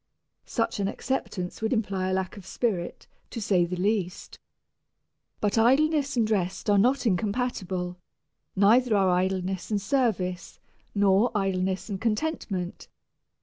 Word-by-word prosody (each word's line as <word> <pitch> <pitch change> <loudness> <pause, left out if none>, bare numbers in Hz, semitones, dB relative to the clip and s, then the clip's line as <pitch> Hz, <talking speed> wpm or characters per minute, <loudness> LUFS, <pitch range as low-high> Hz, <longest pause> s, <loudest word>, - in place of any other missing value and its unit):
Such 230 -3 -1
an 195 - +1
acceptance 200 -6 -3
would 220 - 0
imply 195 -5 0
a - - 0
lack 190 -1 -2
of 200 - -10
spirit, 190 -2 -2 0.2
to 235 - -5
say 190 -5 +2
the 180 +1 -4
least. 185 -1 -2 1.0
But 210 +1 +1
idleness 285 +3 +3
and 225 -2 +3
rest 195 -1 0
are 200 - +5
not 255 +6 +2
incompatible; 190 -4 -1 0.6
neither 225 +4 +4
are 190 -2 +3
idleness 185 0 -1
and 210 -2 +1
service, 195 -7 -1 0.4
nor 200 +3 +4
idleness 190 -1 -1
and 195 -3 -5
contentment. 215 - -2
200 Hz, 130 wpm, -27 LUFS, 185-230 Hz, 1.0 s, are